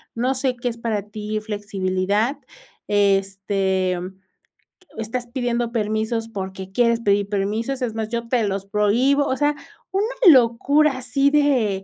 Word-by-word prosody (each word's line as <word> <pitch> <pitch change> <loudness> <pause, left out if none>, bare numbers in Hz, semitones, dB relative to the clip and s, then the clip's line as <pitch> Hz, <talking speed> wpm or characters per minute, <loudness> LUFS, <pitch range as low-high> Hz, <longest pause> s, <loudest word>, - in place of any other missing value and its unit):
no 250 +3 0
sé 255 -1 0
qué 245 0 -2
es 235 - -7
para 225 -3 -2
ti 215 0 -4
flexibilidad, 205 +2 -1 0.5
este, 195 -2 +1 1.0
estás 225 +3 -3
pidiendo 240 -1 -2
permisos 220 0 -1
porque 190 -2 -6
quieres 235 +2 +2
pedir 200 -2 +2
permisos. 215 +6 -2
Es 235 -3 -2
más, 220 -1 -3
yo 235 0 -3
te 245 -2 +2
los 195 0 -3
prohíbo. 235 +8 +2
O 260 - 0
sea, 295 0 +1 0.4
una 425 +6 -1 0.2
locura, 270 +5 +4
así 275 +2 +1
de 255 -10 +2
225 Hz, 135 wpm, -22 LUFS, 200-250 Hz, 1.0 s, locura